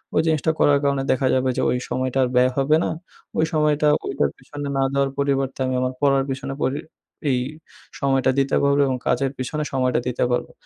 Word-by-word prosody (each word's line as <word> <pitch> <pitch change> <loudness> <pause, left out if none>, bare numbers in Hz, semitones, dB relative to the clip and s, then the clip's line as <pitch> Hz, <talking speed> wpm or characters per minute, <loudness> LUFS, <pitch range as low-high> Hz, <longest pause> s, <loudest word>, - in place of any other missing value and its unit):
ওই - - +5
জিনিসটা 160 0 +2
করার 145 -1 +4
কারণে 140 -1 +1
দেখা 130 0 +1
যাবে 130 0 +1
যে - - +1
ওই - - +1
সময়টা 130 +1 -1
আর 125 - 0
ব্যয় 125 +1 +4
হবে 140 +3 +3
না। - - -1 0.5
ওই 160 - +3
সময়টা 150 -1 +2 0.2
ওইটার 70 - 0
পেছনে 145 -1 -7
না 135 - +2
দেওয়ার 140 0 +1
পরিবর্তে 135 -2 0
আমি 130 0 -1
আমার 130 0 -1
পড়ার 135 -1 +3
পেছনে 135 +1 -4
পরি 135 +3 0 0.5
এই 130 -2 +2 0.6
সময়টা 135 -1 +2
দিতে 135 0 +1
পারবো 140 0 +3
এবং 130 -1 -1
কাজের 135 -1 +1
পেছনে 140 +4 -3
সময়টা 130 -2 +1
দিতে 125 - -1
পারবো। 120 - -1
135 Hz, 195 wpm, -22 LUFS, 130-140 Hz, 0.6 s, ওই